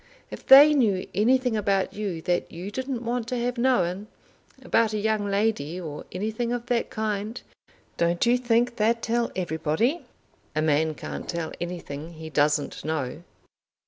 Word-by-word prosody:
If - - -9
they 285 +3 +10
knew 210 -10 +1
anything 250 +3 +2
about 200 -2 0
you 195 -6 -4
that 175 -1 -1
you 180 +4 -7
didn't 260 0 -4
want 235 0 -2
to 250 - -2
have 245 +1 -2
known, 205 -6 +1 0.6
about 225 -2 +2
a - - 0
young 215 -1 0
lady 200 -6 0
or 155 -4 -7
anything 220 +5 -2
of 240 -1 -3
that 240 -1 0
kind, 215 +1 -3 0.6
don't 170 +3 +1
you 240 +1 +4
think 240 0 +1
they'd 230 +1 +1
tell 235 0 0
everybody?" 175 - 0 0.5
"A 155 - +1
man 155 +1 +2
can't - - -7
tell 170 -2 -3
anything 170 -2 -6
he 160 0 -9
doesn't 150 0 +1
know." 155 -2 -3
210 Hz, 155 wpm, -25 LUFS, 170-235 Hz, 0.6 s, they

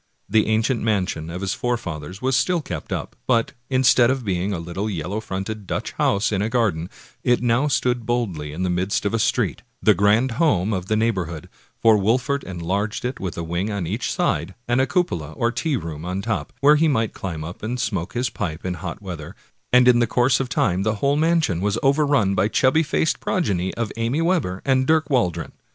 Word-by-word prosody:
The 110 -1 +3
ancient 110 +2 +1
mansion 95 -7 -1
of 90 +2 -5
his 95 -1 -1
forefathers 95 -6 -4
was 130 0 +2
still 170 +7 +2
kept 85 - -6
up, - - -4
but, 115 -3 +2 0.2
instead 130 -2 +4
of 130 -2 -1
being 95 0 -1
a 95 - -1
little 85 +6 -4
yellow 95 +2 -3
fronted 100 0 -5
Dutch - - -3
house 100 +2 +1
in 100 -2 0
a 110 - 0
garden, 100 -9 0 0.3
it 120 -1 +2
now 120 +4 +2
stood 125 -4 +1
boldly 105 -11 -2
in 85 +5 -4
the 90 - 0
midst 95 +4 -1
of 100 - 0
a 115 - +1
street, - - 0 0.2
the - - +5
grand 105 +6 +3
home 105 - +2
of 95 -1 -3
the 110 - +1
neighborhood; 95 -8 -1 0.3
for 110 -2 +5
Wolfert 125 +7 +1
enlarged 95 +6 -3
it 125 +1 -3
with 95 -3 -4
a 85 - -3
wing 85 +5 -2
on 100 -4 -2
each 105 +8 -2
side, 85 +5 -1
and 120 +2 +2
a 130 - +1
cupola 85 - -1
or 115 +6 0
tea 150 +2 -1
room 80 -4 -6
on 90 +2 -3
top, 115 -1 -2
where 150 +2 +6
he 160 +2 +3
might 115 -7 +1
climb 85 -5 -5
up 85 +4 -8
and 120 +3 -3
smoke 100 -7 -2
his 120 -1 -1
pipe 90 -7 -4
in 90 - -1
hot 90 +4 -6
weather, 85 -6 -7 0.4
and 125 0 +6
in 120 -1 +6
the 120 - +3
course 125 +3 +2
of 135 -2 -2
time 90 -5 +1
the 110 +2 0
whole 140 +7 +1
mansion 160 - +2
was 105 +2 0
overrun 140 -7 +3
by 95 0 +2
the - - 0
chubby 135 +7 +3
faced 155 0 0
progeny 95 - 0
of 115 -2 -2
Amy 115 +6 0
Webber 165 - 0
and 130 -1 +2
Dirk 160 -2 +2
Waldron. 90 - 0
110 Hz, 210 wpm, -22 LUFS, 90-125 Hz, 0.4 s, where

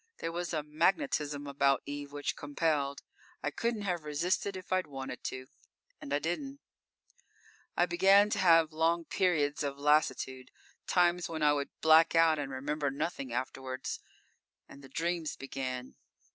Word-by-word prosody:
There 165 - -3
was 175 +1 -3
a 155 -3 -1
magnetism 150 - 0
about 140 -1 +2
Eve 145 0 -6
which 145 -1 -3
compelled. 145 -1 -1 0.4
I 150 - -1
couldn't 230 +6 -2
have 175 -5 -2
resisted 175 +6 -1
if 185 0 -5
I'd 185 0 +1
wanted 135 -2 -7
to 130 0 -4 0.6
and 140 - -8
I 145 - +3
didn't._ 270 - -9
_I 175 - +4
began 195 +4 +5
to - - 0
have 165 -3 +5
long 165 +1 +1
periods 155 -7 +1
of 140 -1 -2
lassitude, 140 -3 +1 0.4
times 175 -1 +2
when 160 -2 -3
I 150 0 +5
would 140 -1 -2
black 160 +1 +6
out 165 -2 +5
and 140 -2 -4
remember 145 +2 -2
nothing 140 -2 -3
afterwards. 130 +1 -4 0.7
And 140 - -14
the 135 - -12
dreams 165 +2 -2
began. 130 -2 -5
150 Hz, 150 wpm, -31 LUFS, 140-175 Hz, 0.7 s, black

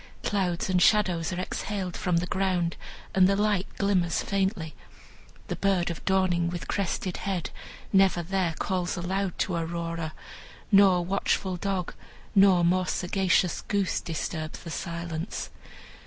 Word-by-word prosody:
Clouds 185 -4 0
and 185 -1 +2
shadows 185 -5 +3
are 180 - -3
exhaled 185 0 -3
from 180 -2 0
the 170 - 0
ground, 180 -2 0 0.4
and 190 0 +5
the 195 - +3
light 205 -2 +1
glimmers 185 -4 +1
faintly. 190 -5 -1 0.7
The - - -2
bird 190 -3 +1
of 170 - -7
dawning, 185 -3 +2
with 175 -1 -5
crested 190 -1 -2
head, 190 -4 -3 0.4
never 190 -3 +4
there 180 -2 -1
calls 185 -1 -1
aloud 185 +1 -2
to 185 - -1
Aurora, 165 -1 -3 0.6
nor 195 -3 +6
watchful 190 0 0
dog, 185 -1 -2 0.4
nor 190 -4 +6
more 180 +1 +2
sagacious 180 -1 +1
goose 200 -3 0
disturbs 155 -1 -4
the 170 - -7
silence. 170 +1 -4
180 Hz, 135 wpm, -27 LUFS, 170-195 Hz, 0.7 s, nor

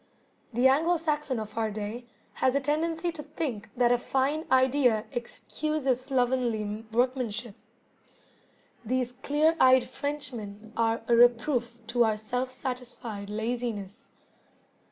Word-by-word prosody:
The 245 +3 +4
Anglo 325 +6 +3
Saxon 300 -6 -1
of 215 -1 -7
our 225 -1 0
day 215 +3 -5 0.4
has 260 0 +3
a - - +4
tendency 320 +4 0
to 330 -2 -7
think 285 -7 -4
that 240 -1 +4
a 245 - +3
fine 275 +5 0
idea 260 -4 +4
excuses 270 +2 -2
slovenly 240 -5 0
workmanship. 240 -2 0 1.3
These 250 +1 -1
clear 305 +4 +3
eyed 255 -1 +6
Frenchmen 230 -7 -6
are 230 0 +1
a 235 - +4
reproof 240 0 +3
to 235 +2 +2
our 220 -2 +1
self 250 +4 -2
satisfied 250 -5 -6
laziness. 220 -2 -4
245 Hz, 120 wpm, -28 LUFS, 225-275 Hz, 1.3 s, eyed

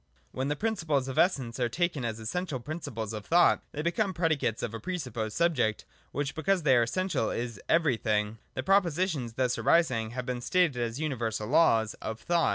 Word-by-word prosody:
When 130 +1 -2
the 145 - 0
principles 160 -9 0
of 135 - -2
Essence 130 -10 +1
are 120 -1 +1
taken 170 0 -1
as 115 -1 -3
essen 180 +12 -3
tial 130 -7 -5
principles 115 -9 -5
of 105 -1 -5
thought 175 +9 +4
they 150 - -4
become 190 +3 0
predicates 160 -9 0
of 115 - -3
a 115 - -4
presupposed 125 - -4
subject, 130 -11 +1 0.3
which, 145 0 -2
because 180 +2 0
they 135 -3 +5
are 120 - +5
essen 185 +10 -1
tial, 140 -11 -1
is 115 -3 -4
' - - -41
Everything.' 110 -9 +1 0.2
The 130 - -2
propositions 170 - +1
thus 125 +1 0
arising 125 -10 +2
have 125 - -2
been 125 -1 -3
stated 175 0 +2
as 115 +2 -2
universal 115 -8 -2
Laws 120 -7 +4
of 110 0 -4
Thought. 170 +8 +2
135 Hz, 195 wpm, -29 LUFS, 115-170 Hz, 0.3 s, they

